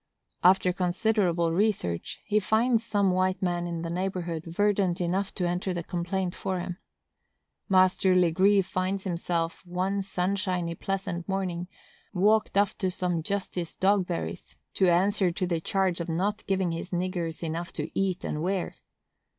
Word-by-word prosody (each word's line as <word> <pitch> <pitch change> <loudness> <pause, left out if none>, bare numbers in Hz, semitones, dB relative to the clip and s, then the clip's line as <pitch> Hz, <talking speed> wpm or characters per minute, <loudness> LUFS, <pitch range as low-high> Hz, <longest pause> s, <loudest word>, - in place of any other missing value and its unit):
After 180 0 +5
considerable 180 -2 +1
research, 175 - -1
he 210 0 +2
finds 225 +3 +2
some 200 -4 +2
white 185 +1 +1
man 175 -1 0
in 170 -1 -4
the 165 - -3
neighborhood 175 -3 -3
verdant 195 0 +1
enough 185 +3 0
to 180 - 0
enter 180 +1 -1
the 170 - -3
complaint 180 +1 -2
for 190 -2 -3
him. 180 0 -5 0.9
Master 185 0 +4
Legree 190 +3 +4
finds 185 +1 -2
himself, 170 -2 -2
one 185 +2 -1
sunshiny, 185 -2 -1
pleasant 185 0 -4
morning, 180 -2 -2 0.5
walked 210 +2 +3
off 200 -1 +3
to 190 - +1
some 180 -2 -1
Justice 185 -1 -3
Dogberry's, 185 -2 0 0.2
to 190 -2 +3
answer 190 +1 +3
to 185 +1 -1
the 170 -2 -1
charge 190 -2 +1
of 170 - -5
not 200 +6 -1
giving 190 -3 +1
his 165 +2 -5
niggers 175 -2 -2
enough 170 +2 -3
to - - -4
eat 195 +1 -1
and 150 - -3
wear. 185 +2 -2
185 Hz, 150 wpm, -27 LUFS, 175-195 Hz, 0.9 s, After